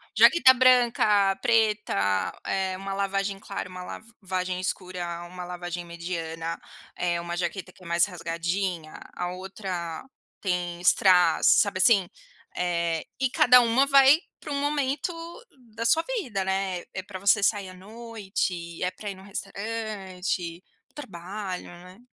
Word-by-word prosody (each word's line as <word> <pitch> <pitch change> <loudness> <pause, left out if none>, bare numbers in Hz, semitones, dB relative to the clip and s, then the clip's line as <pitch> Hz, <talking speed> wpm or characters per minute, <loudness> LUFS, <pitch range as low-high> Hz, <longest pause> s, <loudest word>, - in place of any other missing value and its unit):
Jaqueta 265 -7 +7
branca, 235 -6 +4
preta, 210 - +1
eh, 190 -1 -1
uma 195 +1 -5
lavagem 195 0 -1
clara, 195 -2 -5
uma 185 0 -8
lavagem 185 -4 -5
escura, 180 -2 -4
uma 180 +1 -8
lavagem 175 -1 -6
mediana, 165 -1 -5 0.4
eh, 175 -1 -1
uma 170 0 -4
jaqueta 185 +1 -3
que 185 - -23
é 170 - -10
mais 170 0 +3
rasgadinha, 170 -1 -3 0.2
a 180 0 -3
outra 185 -3 -5 0.4
tem 180 -2 -2
strass, 180 0 +5
sabe 200 -2 -1
assim? 195 -2 +5 0.5
Eh, 170 -2 -1
e 265 -1 +1
cada 250 0 +7
uma 245 +4 +3
vai 275 +2 +7 0.2
para 300 - -8
um 280 - -1
momento 285 +2 -1 0.6
da 230 +1 -4
sua 320 +8 +4 0.2
vida, 210 - -3
né. 190 -2 -1
É 190 - -3
para 190 0 -9
você 200 +2 +4
sair 200 -1 +1
à 185 - -11
noite, 195 -4 -5
é 180 - 0
para 205 +3 -7
ir 195 - -6
no 190 - -14
restaurante, 195 -4 -4 0.3
trabalho, 190 - -6
né. 180 +5 -14
190 Hz, 140 wpm, -26 LUFS, 175-215 Hz, 0.6 s, Jaqueta